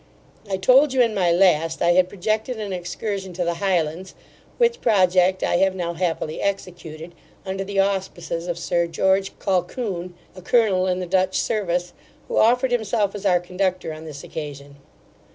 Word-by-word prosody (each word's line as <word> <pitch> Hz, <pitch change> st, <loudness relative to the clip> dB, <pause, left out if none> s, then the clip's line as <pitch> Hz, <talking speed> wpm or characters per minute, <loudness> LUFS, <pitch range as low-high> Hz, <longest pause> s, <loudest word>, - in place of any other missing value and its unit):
I 190 Hz, -, 0 dB
told 260 Hz, +8 st, +5 dB
you, 260 Hz, -, +3 dB
in 230 Hz, -2 st, 0 dB
my 180 Hz, -4 st, +2 dB
last, 165 Hz, -3 st, +3 dB
I 170 Hz, -, +2 dB
had 180 Hz, +1 st, +3 dB
projected 215 Hz, +5 st, -2 dB
an 205 Hz, -3 st, -4 dB
excursion 190 Hz, +1 st, -4 dB
to 175 Hz, 0 st, -2 dB
the 170 Hz, -, 0 dB
Highlands, 180 Hz, -1 st, -1 dB, 0.4 s
which 475 Hz, -1 st, +2 dB
project 185 Hz, -3 st, +3 dB
I -, -, +2 dB
have 190 Hz, +1 st, +2 dB
now 170 Hz, -2 st, -3 dB
happily 165 Hz, -2 st, -2 dB
executed, 175 Hz, -4 st, -5 dB, 0.3 s
under 190 Hz, 0 st, -3 dB
the 195 Hz, 0 st, -2 dB
auspices 190 Hz, -3 st, -1 dB
of 175 Hz, -1 st, -2 dB
Sir 170 Hz, 0 st, 0 dB
George 190 Hz, +3 st, 0 dB
Colquhoun, 185 Hz, -1 st, -2 dB, 0.2 s
a 185 Hz, -, -10 dB
colonel 190 Hz, -3 st, +2 dB
in 185 Hz, 0 st, 0 dB
the -, -, -3 dB
Dutch 185 Hz, +1 st, +1 dB
service, 180 Hz, -5 st, -1 dB, 0.3 s
who -, -, -3 dB
offered 245 Hz, +3 st, +3 dB
himself 220 Hz, -3 st, 0 dB
as 205 Hz, -1 st, -3 dB
our 180 Hz, -2 st, +4 dB
conductor 180 Hz, -1 st, -2 dB
on 155 Hz, +1 st, -10 dB
this 145 Hz, -3 st, -9 dB
occasion. 145 Hz, -2 st, -8 dB
185 Hz, 170 wpm, -22 LUFS, 175-200 Hz, 0.4 s, told